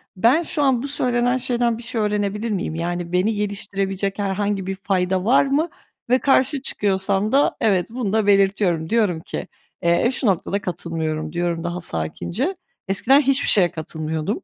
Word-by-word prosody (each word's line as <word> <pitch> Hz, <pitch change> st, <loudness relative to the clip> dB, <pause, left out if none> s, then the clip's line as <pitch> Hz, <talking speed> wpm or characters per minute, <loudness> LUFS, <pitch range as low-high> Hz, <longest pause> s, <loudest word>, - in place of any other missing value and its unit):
"Ben 235 Hz, -, +4 dB
şu 310 Hz, -3 st, -1 dB
an 260 Hz, -3 st, +2 dB
bu 280 Hz, -, -3 dB
söylenen 245 Hz, -2 st, +1 dB
şeyden 240 Hz, -2 st, 0 dB
bir 235 Hz, -, -10 dB
şey 230 Hz, -1 st, -2 dB
öğrenebilir 210 Hz, +1 st, -1 dB
miyim?" 180 Hz, -5 st, -2 dB
Yani, 175 Hz, +1 st, -3 dB
beni 185 Hz, +5 st, +1 dB
geliştirebilecek 200 Hz, -1 st, -2 dB
herhangi 200 Hz, 0 st, -1 dB
bir 195 Hz, -, -2 dB
fayda 190 Hz, -1 st, -1 dB
var 245 Hz, +5 st, +5 dB
mı 290 Hz, +5 st, +1 dB, 0.4 s
ve 255 Hz, +1 st, +4 dB
karşı 270 Hz, +1 st, +2 dB
çıkıyorsam 200 Hz, -3 st, 0 dB
da 280 Hz, +2 st, +3 dB
evet, 195 Hz, -5 st, +2 dB
bunu 230 Hz, -4 st, -3 dB
da 220 Hz, -2 st, +1 dB
belirtiyorum, 195 Hz, -5 st, +2 dB
diyorum 210 Hz, -8 st, +1 dB
ki, 160 Hz, -, -6 dB, 0.3 s
eee, 170 Hz, +6 st, +3 dB
"Şu 255 Hz, -, -1 dB
noktada 200 Hz, +1 st, 0 dB
katılmıyorum." 160 Hz, -3 st, -3 dB
diyorum 170 Hz, -1 st, -1 dB
daha 175 Hz, +1 st, -3 dB
sakince, 170 Hz, -, -3 dB, 0.3 s
eskiden 255 Hz, +9 st, +4 dB
hiçbir 275 Hz, 0 st, +1 dB
şeye 180 Hz, -5 st, +5 dB
katılmıyordum, 160 Hz, +4 st, -4 dB
200 Hz, 160 wpm, -21 LUFS, 180-240 Hz, 0.4 s, var